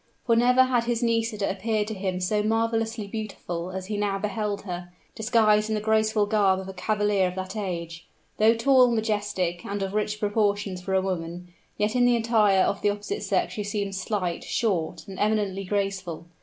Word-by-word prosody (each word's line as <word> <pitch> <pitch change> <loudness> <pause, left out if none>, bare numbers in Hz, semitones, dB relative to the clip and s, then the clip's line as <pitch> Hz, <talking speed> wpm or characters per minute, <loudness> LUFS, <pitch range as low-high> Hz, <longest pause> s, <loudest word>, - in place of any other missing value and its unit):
For 230 - +3
never 250 +2 +5
had 250 -2 +1
his 240 0 -1
Nisida 225 -3 0
appeared 210 +2 -1
to - - -3
him 190 -2 -2
so 210 +4 +1
marvelously 225 0 0
beautiful 195 -5 -5
as 190 0 -5
he 210 +1 -3
now 205 -1 0
beheld 205 0 -2
her, 175 -2 -6 0.2
disguised 215 -2 +3
in 220 - 0
the - - 0
graceful 220 0 +2
garb 200 -3 +2
of 190 - -7
a 190 - -6
cavalier 205 0 +1
of 180 - -5
that 185 +1 -5
age. 170 -5 -5 0.3
Though 220 +2 +5
tall, 255 +1 +5
majestic, 205 -6 -1
and 200 0 -3
of 195 0 -4
rich 210 0 -1
proportions 205 -3 0
for 190 +1 -2
a 190 - +3
woman, 175 -1 -4 0.3
yet 210 +3 0
in 245 -1 +4
the 245 -1 +4
attire 215 -4 +3
of 200 - -1
the 205 - +3
opposite 205 - -3
sex - - 0
she 210 - -3
seemed 200 -1 -3
slight, 190 -2 -2
short, 170 -7 -1
and 190 -1 -8
eminently 205 -2 0
graceful. 190 -4 -2
205 Hz, 190 wpm, -26 LUFS, 190-220 Hz, 0.3 s, never